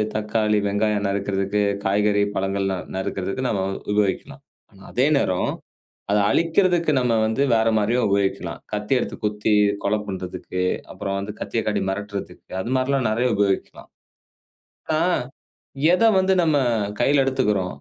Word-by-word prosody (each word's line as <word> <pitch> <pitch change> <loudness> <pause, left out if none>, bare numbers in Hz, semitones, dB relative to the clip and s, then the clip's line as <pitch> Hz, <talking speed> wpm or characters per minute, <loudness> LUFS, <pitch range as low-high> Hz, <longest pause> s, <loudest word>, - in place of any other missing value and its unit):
தக்காளி, 105 0 +1
வெங்காயம் 105 0 0
நறுக்கறதுக்கு 100 +1 -1 0.2
காய்கறி, 105 +1 +2
பழங்களா 95 0 -1 0.2
நறுக்கறதுக்கு 95 +5 -3
நம்ம 100 -3 0 0.3
உபயோகிக்கலாம். 105 +7 -1 0.5
அதே 130 +3 +1
நேரம், 95 -9 0 0.6
அதை 105 - +3
அழிக்கிறதுக்கு 170 -1 +2
நம்ம 125 -2 +1
வந்து 110 +4 0
வேற 110 0 +2
மாரியும் 115 +4 +1
உபயோகிக்கலாம். 100 -1 -1
கத்தி 105 +5 -1
எடுத்து - - -3
குத்தி, 105 +1 0 0.3
கொலை 105 +2 +1
பண்றதுக்கு, 90 -1 -4 0.3
அப்புறம் 100 0 -3
வந்து 105 +1 -5
கத்தியை 115 - -2
காட்டி 105 - 0
மிரட்டுதற்கு, 100 +1 -6
அது 120 - -4
மாரில்லாம் 130 -2 +1
நெறையா 120 +2 +1
உபயோகிக்கலாம். 100 -2 -1 1.1
அ - - +1 1.0
எதை 225 +4 +4
வந்து 190 0 +2
நம்ம 155 -3 +2 0.4
கையில 140 0 +4
எடுத்துக்கிறோ? 105 -8 +1
105 Hz, 125 wpm, -22 LUFS, 100-125 Hz, 1.1 s, எதை